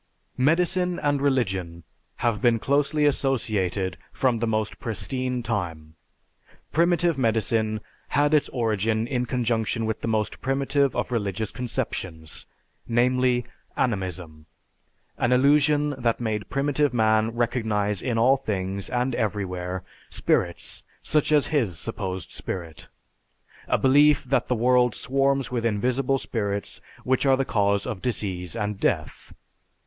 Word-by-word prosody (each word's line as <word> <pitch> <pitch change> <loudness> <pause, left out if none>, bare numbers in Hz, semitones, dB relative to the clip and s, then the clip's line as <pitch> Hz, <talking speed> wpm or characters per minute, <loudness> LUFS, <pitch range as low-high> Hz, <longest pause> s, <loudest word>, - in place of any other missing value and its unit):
Medicine 180 +5 +2
and 145 -4 0
religion 95 - 0 0.4
have 115 -3 +1
been 120 -2 +4
closely 145 +4 +1
associated 105 - 0
from 125 -4 +1
the 115 - 0
most 110 -1 -1
pristine 125 +2 -2
time. 85 -9 -3 0.8
Primitive 170 -2 +2
medicine 110 -2 +1 0.3
had 145 +1 +2
its 150 - +3
origin 110 -2 0
in 125 0 -2
conjunction 115 -2 0
with 110 0 -2
the - - -3
most 110 -1 -1
primitive 140 +1 +1
of - - -2
religious 105 -2 -2
conceptions, 95 -10 -5 0.4
namely, 125 +1 +2 0.3
animism; 90 -8 -2 0.7
an 120 - +2
illusion 145 +3 +4
that 120 -2 +1
made 110 -3 -2
primitive 145 -1 +1
man 110 0 +3
recognize 110 -4 0
in 120 -3 -1
all 130 +4 +5
things, 100 -6 -3
and 125 +1 0
everywhere, 95 -5 -2 0.3
spirits - - -1 0.2
such 155 0 +1
as 150 -2 +5
his 110 - +1
supposed 95 -2 -5
spirit; 85 -4 -6 0.8
a - - +2
belief 145 +2 +5
that 135 +1 0
the 125 - +1
world 125 0 +3
swarms 135 0 0
with 120 -2 -1
invisible 125 +5 +1
spirits 100 -5 -3 0.2
which 130 0 +1
are 135 -1 +4
the 135 - 0
cause 100 -3 +1
of 95 - -4
disease 95 -6 -3
and 105 -3 -3
death. 80 -6 -2
115 Hz, 125 wpm, -25 LUFS, 105-135 Hz, 0.8 s, all